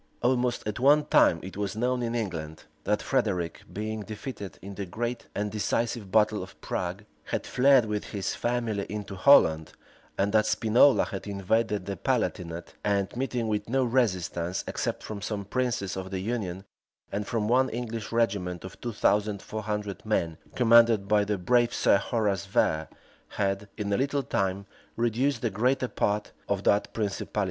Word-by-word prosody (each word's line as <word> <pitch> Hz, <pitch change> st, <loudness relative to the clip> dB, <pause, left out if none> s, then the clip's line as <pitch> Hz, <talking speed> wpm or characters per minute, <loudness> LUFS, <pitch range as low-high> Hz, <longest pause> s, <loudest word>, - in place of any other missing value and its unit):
Almost 125 Hz, 0 st, +1 dB
at 105 Hz, -, -3 dB
one 145 Hz, +3 st, +5 dB
time 85 Hz, -, +4 dB
it 95 Hz, -, -8 dB
was 100 Hz, -1 st, -3 dB
known 125 Hz, +2 st, 0 dB
in 120 Hz, 0 st, -2 dB
England, 80 Hz, -8 st, -4 dB, 0.2 s
that 105 Hz, -, +1 dB
Frederic, 100 Hz, -10 st, -1 dB
being 110 Hz, +3 st, -4 dB
defeated 105 Hz, -1 st, -7 dB
in 100 Hz, +2 st, -8 dB
the 100 Hz, -1 st, -5 dB
great 120 Hz, +6 st, -4 dB
and 105 Hz, 0 st, -2 dB
decisive 110 Hz, 0 st, -1 dB
battle 110 Hz, -1 st, +3 dB
of 95 Hz, -, -10 dB
Prague, 90 Hz, +4 st, -4 dB, 0.2 s
had -, -, -3 dB
fled 135 Hz, -1 st, +5 dB
with 105 Hz, -1 st, -3 dB
his 100 Hz, -3 st, -3 dB
family 120 Hz, -4 st, -1 dB
into 105 Hz, -1 st, -5 dB
Holland, 85 Hz, -, +5 dB, 0.4 s
and 100 Hz, +2 st, +1 dB
that 110 Hz, -1 st, +4 dB
Spinola 120 Hz, +5 st, +4 dB
had 95 Hz, 0 st, -6 dB
invaded 105 Hz, +1 st, 0 dB
the 100 Hz, -2 st, -4 dB
Palatinate, 85 Hz, 0 st, -2 dB
and, 100 Hz, 0 st, 0 dB
meeting 125 Hz, -2 st, -1 dB
with 105 Hz, 0 st, -2 dB
no 135 Hz, +2 st, +2 dB
resistance, 95 Hz, -8 st, 0 dB
except -, -, -3 dB
from 105 Hz, -2 st, -6 dB
some 105 Hz, -1 st, -3 dB
princes 115 Hz, -4 st, -1 dB
of 95 Hz, 0 st, -5 dB
the 95 Hz, -1 st, -3 dB
union, 95 Hz, -3 st, -3 dB, 0.5 s
and 100 Hz, +1 st, -3 dB
from 110 Hz, -2 st, -1 dB
one 130 Hz, +3 st, +3 dB
English 115 Hz, -2 st, -5 dB
regiment 100 Hz, -6 st, 0 dB
of 95 Hz, -, -10 dB
two 120 Hz, -1 st, -4 dB
thousand 105 Hz, 0 st, +1 dB
four 110 Hz, +2 st, -6 dB
hundred 105 Hz, -2 st, -4 dB
men, 85 Hz, -7 st, -1 dB, 0.2 s
commanded 115 Hz, -4 st, +5 dB
by 105 Hz, 0 st, +4 dB
the 105 Hz, 0 st, -1 dB
brave 120 Hz, +5 st, +2 dB
Sir -, -, +4 dB
Horace 105 Hz, -4 st, -1 dB
Vere,[] 80 Hz, 0 st, +1 dB, 0.4 s
had, 100 Hz, 0 st, -2 dB
in 100 Hz, -1 st, -2 dB
a -, -, +2 dB
little 140 Hz, +1 st, 0 dB
time, 100 Hz, -3 st, -1 dB, 0.3 s
reduced 120 Hz, +2 st, 0 dB
the 115 Hz, -, +1 dB
greater 125 Hz, +6 st, +1 dB
part 105 Hz, -3 st, -1 dB, 0.2 s
of 100 Hz, -1 st, 0 dB
that 100 Hz, -, +2 dB
principality. 105 Hz, -1 st, -3 dB
105 Hz, 170 wpm, -27 LUFS, 100-120 Hz, 0.5 s, one